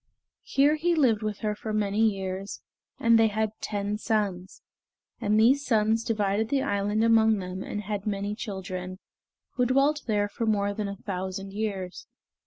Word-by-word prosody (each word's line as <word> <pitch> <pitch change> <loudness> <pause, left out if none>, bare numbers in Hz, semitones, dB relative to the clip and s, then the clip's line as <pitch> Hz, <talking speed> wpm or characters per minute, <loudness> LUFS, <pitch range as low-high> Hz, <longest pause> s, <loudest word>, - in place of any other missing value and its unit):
Here 290 +3 +2
he 340 +2 +1
lived 240 -8 +3
with 215 -1 -3
her 210 -1 0
for 215 +1 -5
many 210 -1 0
years, 195 -2 -1 0.4
and 230 0 +5
they 225 - +5
had 215 0 -1
ten 205 0 -2
sons; 195 -5 -2 0.6
and 210 +1 +2
these 265 +6 +4
sons 225 -3 +2
divided 210 -1 0
the 275 -1 +1
island 205 +2 0
among 220 -1 +4
them 185 0 -5
and 210 +1 -4
had 205 0 -4
many 200 0 -2
children, 185 -3 -5 0.6
who 250 -1 +3
dwelt 280 +4 +2
there 205 -2 +1
for 225 +2 -4
more 205 -2 +1
than 210 0 -3
a 200 - -5
thousand 190 0 -5
years. 200 -4 -4
210 Hz, 165 wpm, -27 LUFS, 200-225 Hz, 0.6 s, and